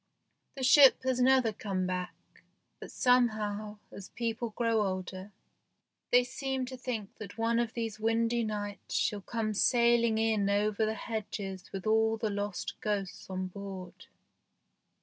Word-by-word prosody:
The 265 - -5
ship 270 0 +7
has 255 -1 0
never 255 -3 +4
come 195 -3 -2
back, 180 -1 -3 0.6
but - - -9
somehow 215 -4 +1
as 195 - -10
people 230 0 -3
grow 230 0 +1
older 185 0 -4 0.8
they 245 0 +6
seem 265 +1 -3
to 260 +1 -7
think 240 -5 -5
that 210 -1 -9
one 230 +1 +1
of 235 -2 -2
these 225 -3 -3
windy 230 +1 +1
nights 205 -2 -4
shell 205 -1 0
come 220 +1 -2
sailing 235 0 +3
in 220 -3 +1
over 210 +1 +1
the 220 - -1
hedges 205 -4 -5
with 195 -2 -6
all 220 +1 +3
the 220 -1 -2
lost 205 -1 -4
ghosts 200 -4 -3
on 185 0 -3
board. 190 -1 -8
220 Hz, 145 wpm, -30 LUFS, 200-235 Hz, 0.8 s, ship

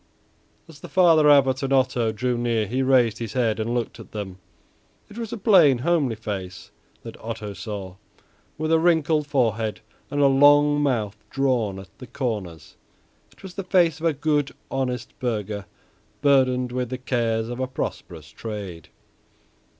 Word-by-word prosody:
As 160 -3 -14
the - - -10
Father 165 -5 +5
Abbot 135 -2 +4
and 135 0 -2
Otto 130 -4 +2
drew 125 +3 -1
near 120 -2 0
he 125 +6 -2
raised 125 -4 +3
his 115 -3 -5
head 115 -4 0
and 115 +2 -1
looked 120 0 -3
at 115 - -13
them. 95 -3 -6 0.7
It 205 - -13
was 230 -2 -5
a - - -4
plain, 185 - +5
homely 140 -3 +1
face 95 -4 -6 0.3
that - - -10
Otto 110 -2 -5
saw, 95 -1 -7 0.6
with 155 +1 -2
a 165 - +5
wrinkled 160 -3 +2
forehead 115 -6 0 0.3
and 145 - -2
a 145 - +5
long 145 +2 +5
mouth 110 -7 -1
drawn 125 -7 0
down 95 - -8
at - - -22
the 125 - -10
corners. 105 - -5 0.5
It - - -22
was 190 -2 -9
the 195 - -5
face 175 -5 +2
of 165 - 0
a 160 - +2
good, 145 0 -1 0.2
honest 125 -2 -3
burgher 105 -5 -3 0.6
burdened 130 -3 +3
with 125 -1 -2
the 130 - -4
cares 115 -3 -1
of 120 +1 -6
a 130 - -1
prosperous 80 - -6
trade. 100 -8 -7
125 Hz, 165 wpm, -24 LUFS, 110-145 Hz, 0.7 s, Father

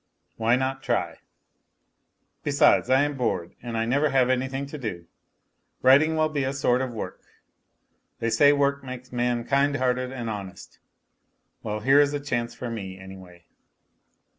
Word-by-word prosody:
Why 115 +1 +2
not 130 +1 -2
try? - - -2 1.2
Besides, 140 -3 +3
I 130 +2 +4
am 145 0 -2
bored, 110 -9 -2
and 120 -1 -5
I 115 - 0
never 140 +6 +2
have 130 -2 +3
anything 130 +2 -1
to 145 +2 -8
do. 90 -9 -5 0.8
Writing 145 +5 +5
will 155 0 +2
be 150 -3 -2
a 130 +1 -1
sort 130 -2 +1
of 130 -2 -3
work. 115 - -7 1.0
They 115 0 -2
say 145 +6 +5
work 140 -1 +1
makes 130 -1 -9
man 120 -1 0
kind 140 +1 +2
hearted 130 -1 0
and 120 -3 -5
honest. 100 -3 -7 0.8
Well, 105 0 -4
here 135 +5 +5
is 145 0 +1
a - - -2
chance 120 -4 -3
for 120 -2 -6
me, 95 -4 -6
anyway. 95 -2 -13
130 Hz, 160 wpm, -25 LUFS, 115-140 Hz, 1.2 s, Writing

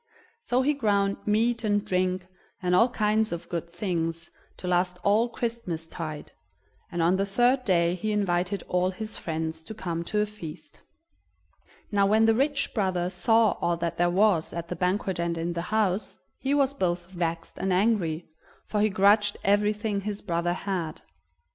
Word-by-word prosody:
So 255 - +1
he 295 +3 +3
ground 200 -7 +1
meat 230 +3 +2
and 205 -1 +1
drink, 185 -1 0 0.3
and 180 -2 0
all 230 +7 +5
kinds 215 -1 +1
of 170 -1 -5
good 170 -1 -3
things, 170 -2 -3 0.3
to 180 - -7
last 180 0 +1
all 215 +4 +3
Christmas 230 -10 -3
tide, 160 -2 -6 0.6
and 170 -1 0
on 175 +3 +3
the 195 - +1
third 245 +6 +3
day 170 -3 +3
he 215 +4 -2
invited 190 -2 0
all 180 0 +1
his 215 +3 -6
friends 160 -1 -3
to 220 - -8
come 170 -5 -3
to 210 - -1
a 210 - +3
feast. 205 -7 -10 1.1
Now 200 -1 +3
when 220 +2 +4
the 225 - +5
rich 280 +5 0
brother 185 -4 0
saw 225 +1 +3
all 175 0 +1
that 170 0 -3
there 175 0 +3
was 185 -2 +2
at 170 0 -5
the 180 - -3
banquet 185 0 -1
and 170 0 -1
in 170 +1 -2
the 170 - -2
house, 210 -2 0 0.2
he 275 +1 0
was 275 -1 +3
both 175 -7 -1
vexed 170 -2 -3
and 190 0 0
angry, 180 -4 +1 0.4
for 210 - -1
he 215 - +4
grudged 205 +2 +4
everything 210 +1 +1
his 205 0 -5
brother 175 -2 0
had. 180 -4 -3
190 Hz, 175 wpm, -27 LUFS, 175-215 Hz, 1.1 s, all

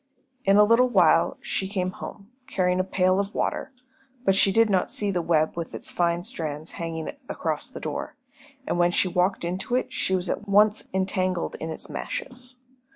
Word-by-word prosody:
In 195 +1 +5
a 210 - +8
little 230 +4 +4
while - - +4
she 190 - -2
came 185 -2 -2
home, 200 +3 -9 0.2
carrying 180 -7 +1
a - - +3
pail 185 0 +2
of 200 +1 -3
water, - - -1 0.5
but 195 - +5
she 195 0 +4
did 225 +3 +4
not 190 -3 +1
see 205 -1 0
the 180 -2 0
web 160 -2 +1
with 170 -1 -5
its - - -4
fine 170 0 +1
strands 155 -2 -4
hanging 165 -1 -4 0.2
across - - -2
the - - -9
door, - - -4 0.5
and 175 - -1
when 175 0 +5
she 175 - +2
walked 180 0 +1
into 185 +7 -2
it 255 - -1
she 190 - +1
was 180 0 -1
at 210 - -3
once 210 +2 +4
entangled 185 -1 0
in 160 - -4
its 160 - -5
meshes. 255 - -5
185 Hz, 190 wpm, -25 LUFS, 175-205 Hz, 0.5 s, a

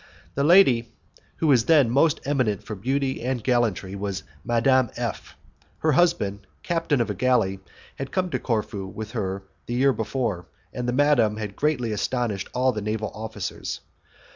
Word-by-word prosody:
The 140 - 0
lady 140 -9 +5 0.4
who - - -2
was 130 -6 +4
then 145 -7 +5
most 145 +4 +3
eminent 130 -8 0
for 110 - -6
beauty 130 +6 -1
and 125 -1 -2
gallantry 115 -6 +1
was 100 -1 -4 0.2
Madame 120 +1 +3
F. - - -4 0.4
Her 155 - +1
husband, 105 - +1 0.2
captain 165 -6 +1
of 115 - -1
a - - -2
galley, 110 -4 +1 0.4
had 135 -1 -5
come 185 -2 -1
to - - -1
Corfu 105 -4 -2
with 110 +2 -7
her 95 -4 -3 0.2
the 120 - -2
year 135 +2 +4
before, 110 -6 -2 0.3
and 125 0 -2
madam 125 -6 +3
had 105 -2 -5
greatly 130 -6 0
astonished 105 -2 -2
all 130 +1 +2
the 110 -3 -4
naval 110 0 -2
officers. 110 -3 -5
120 Hz, 160 wpm, -25 LUFS, 105-135 Hz, 0.4 s, lady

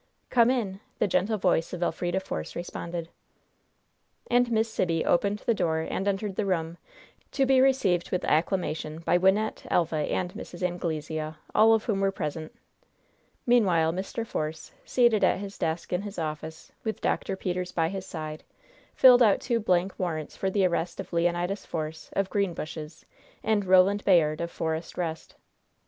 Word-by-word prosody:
"Come 235 -1 +5
in!" 210 -7 -1 0.2
the - - +2
gentle 195 +4 +1
voice 180 -4 +1
of 175 0 -2
Elfrida 175 +2 -1
Force 80 - -6
responded. 170 -1 -5 1.2
And 245 0 +3
Miss 220 0 +2
Sibby 170 -7 -1
opened 200 +4 +1
the 235 - +3
door 165 -5 0
and 190 +4 -3
entered 200 0 -1
the 215 - 0
room, 170 -2 -1 0.5
to 275 - +2
be 265 -1 +4
received 210 -10 +2
with 180 - -1
acclamation 160 -1 0
by 175 +1 +2
Wynnette, 195 +4 +1
Elva 165 -2 +1
and 180 +4 -1
Mrs. 175 +1 -8
Anglesea, 160 -3 -3 0.2
all 225 +1 +6
of 220 - -1
whom 205 -4 -1
were 195 0 +2
present. 155 -4 -4 0.9
Meanwhile, 180 -10 +3
Mr. 195 +5 -4
Force, 155 -6 -4
seated 240 -4 +3
at - - +4
his 200 +1 -8
desk 165 +2 -2
in 180 - +1
his 205 0 -7
office, 160 0 -5
with 220 -1 -3
Dr. 195 - -1
Peters 180 -1 -3
by 165 -1 0
his 190 0 -6
side, 155 -2 -6 0.5
filled 250 -1 +8
out 215 -4 +5
two 235 -3 0
blank 185 -3 +1
warrants 160 -5 -3
for 190 - -1
the 195 0 +2
arrest 175 -1 -1
of - - -7
Leonidas 175 +3 0
Force, 155 -1 -5
of 195 -1 0
Greenbushes, 165 -5 -3 0.4
and 215 -2 +1
Roland 190 +2 +4
Bayard, 160 -4 +3
of 170 - -2
Forest 160 -1 -4
Rest. 165 -2 -4
180 Hz, 160 wpm, -27 LUFS, 165-205 Hz, 1.2 s, filled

